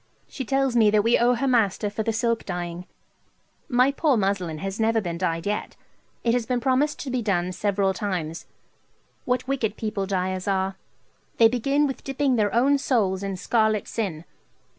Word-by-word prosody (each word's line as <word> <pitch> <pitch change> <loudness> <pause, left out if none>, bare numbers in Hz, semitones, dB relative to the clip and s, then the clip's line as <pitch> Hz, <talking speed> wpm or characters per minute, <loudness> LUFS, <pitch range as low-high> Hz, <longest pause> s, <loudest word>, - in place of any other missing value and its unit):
She 265 - -6
tells 270 0 +1
me 220 -3 +5
that 210 0 +3
we 230 +2 +3
owe 245 +1 +4
her 270 +4 -1
master 220 -5 +2
for 215 - -3
the 225 - 0
silk 230 0 0
dyeing. 175 -1 -5 0.8
My 250 +1 +4
poor 300 +2 -1
old 235 - +2
muslin 185 -5 -1
has 195 +6 -5
never 225 0 +2
been 170 -5 -4
dyed 165 -2 -1
yet. 210 +1 -3 0.5
It 235 - +2
has 240 -2 0
been 250 -1 0
promised 265 +4 +1
to 270 - -5
be 250 -1 0
done 185 -4 0
several 195 0 0
times. 180 -5 -4 0.8
What 250 0 -1
wicked 235 -6 -1
people 210 -3 -3
dyers 185 0 -2
are. 190 -1 0 0.6
They 225 - +7
begin 275 +5 +1
with 270 -2 -4
dipping 270 -1 0
their 210 -3 +1
own 275 +5 +3
souls 205 -9 +1
in 195 -1 -3
scarlet 215 +1 +1
sin. 175 -8 -3
220 Hz, 185 wpm, -24 LUFS, 190-250 Hz, 0.8 s, They